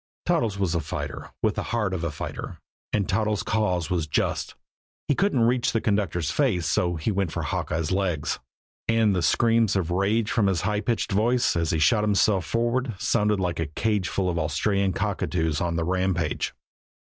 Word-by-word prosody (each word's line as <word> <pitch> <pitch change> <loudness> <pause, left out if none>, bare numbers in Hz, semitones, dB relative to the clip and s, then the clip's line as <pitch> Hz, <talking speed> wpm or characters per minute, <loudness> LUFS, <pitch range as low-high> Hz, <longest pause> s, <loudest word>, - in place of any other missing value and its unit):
Toddles 135 - +1
was 95 -4 0
a 85 - +1
fighter 75 - -5
with - - +3
the - - -3
heart 105 -5 -1
of 90 -2 -3
a 85 - 0
fighter. 75 - -6 0.3
And 100 -3 0
Toddles' 105 +1 0
cause 95 -5 0
was 85 -3 0
just. - - -1 0.5
He - - +3
couldn't 145 -5 +1
reach 120 +1 +2
the 115 - +2
conductor's 95 -8 0
face 110 - +1
so 90 0 +1
he 80 +7 -1
went 95 -4 -1
for - - -3
Hawkeye's 80 +1 -2
legs. 90 -5 -1 0.5
And 115 -3 +3
the 90 - +1
screams 115 +2 +3
of 90 -3 0
rage 105 +4 +1
from 105 -3 +2
his 95 -4 +1
high 105 +3 0
pitched 115 -1 -1
voice, 120 +5 +2
as 85 -1 0
he 80 - +1
shot 105 +7 +3
himself 100 -3 +2
forward, 120 0 0
sounded 105 0 +1
like 90 -3 -1
a 80 - -1
cageful 95 +2 -1
of 85 -2 0
Australian 95 +5 +1
cockatoos 90 -6 -1
on 85 -1 -1
the 85 - 0
rampage. 90 -2 -1
100 Hz, 185 wpm, -25 LUFS, 85-110 Hz, 0.5 s, with